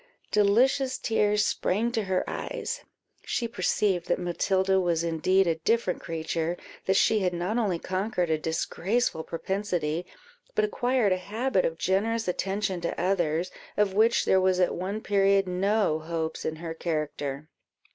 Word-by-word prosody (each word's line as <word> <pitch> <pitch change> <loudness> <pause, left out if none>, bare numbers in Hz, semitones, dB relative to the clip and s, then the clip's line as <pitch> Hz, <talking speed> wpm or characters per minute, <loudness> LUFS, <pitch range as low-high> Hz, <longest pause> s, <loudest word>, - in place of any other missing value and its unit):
Delicious 255 +6 +3
tears 210 -2 +2
sprang 225 +6 0
to 225 -3 -1
her 190 -1 0
eyes; - - -4 0.4
she 240 -1 -1
perceived 200 -5 0
that - - +1
Matilda 190 +2 +1
was 170 -3 +1
indeed 170 +4 +2
a 165 -2 0
different 225 0 0
creature; 165 +1 -2 0.3
that 190 - +3
she 220 +2 +4
had 180 -2 0
not 185 +7 -1
only 200 -7 +1
conquered 185 -1 -1
a 155 - +1
disgraceful 170 +4 -1
propensity, 175 -2 -2 0.5
but 215 - +3
acquired 245 0 +1
a - - 0
habit 210 +3 0
of 165 - -2
generous 220 +6 0
attention 190 0 -1
to 170 - -3
others, 175 -1 0 0.3
of 205 -2 +2
which 225 +4 +3
there 190 - +4
was 185 -1 +2
at 180 - +3
one 195 +4 -3
period 195 -2 +3
no 190 -2 +1
hopes 160 0 -4
in 160 - -1
her 165 0 -6
character. 150 -3 -3
190 Hz, 150 wpm, -27 LUFS, 170-210 Hz, 0.5 s, she